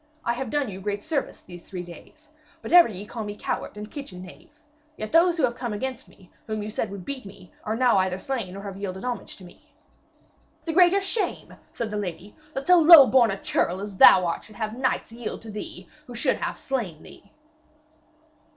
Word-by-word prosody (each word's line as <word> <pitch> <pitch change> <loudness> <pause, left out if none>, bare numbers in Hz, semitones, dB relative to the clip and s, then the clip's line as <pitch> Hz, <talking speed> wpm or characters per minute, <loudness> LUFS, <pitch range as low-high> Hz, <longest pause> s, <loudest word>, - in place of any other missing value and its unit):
I 235 - +1
have 250 0 -4
done 290 0 0
you 195 -2 -7
great 205 +1 -3
service 315 -3 -3
these 175 -1 -12
three 180 0 -7
days, 175 -1 -14 0.4
but - - -5
ever 350 -1 +9
ye 200 -1 -7
call 225 +1 -6
me 205 0 -6
coward - - -4
and 210 +1 -8
kitchen 190 -11 -8
knave. 185 - -14 0.5
Yet 215 - -5
those 340 +1 +4
who 320 - 0
have 245 -2 +2
come 240 -3 -4
against 260 +5 -5
me, 185 - -21 0.2
whom 215 -1 -3
you 210 - -6
said 220 - -2
would 195 -2 -8
beat 275 -2 -5
me, 195 -2 -13
are 215 +1 -1
now 245 -4 +3
either 185 -1 0
slain 200 -4 -4
or 200 - -8
have 195 -2 -7
yielded 190 +1 -5
homage 245 -1 -5
to 190 - -14
me.' 175 - -19 0.9
'The 325 - -2
greater 365 +3 +5
shame,' 390 +3 -3 0.2
said 230 -3 -3
the 210 - -3
lady, 185 0 -6 0.2
'that 270 +1 -3
so 360 -1 +6
lowborn 275 -7 +8
a 195 - -2
churl 180 +2 -1
as 200 -1 -7
thou 185 -1 +8
art 170 - -2
should 215 - -16
have 220 +1 -4
knights 260 -2 -1
yield 230 -1 -7
to 220 - -8
thee 210 - -8 0.2
who - - -9
should - - +1
have - - -4
slain 215 - -4
thee.' 200 - -16
215 Hz, 215 wpm, -25 LUFS, 195-265 Hz, 0.9 s, ever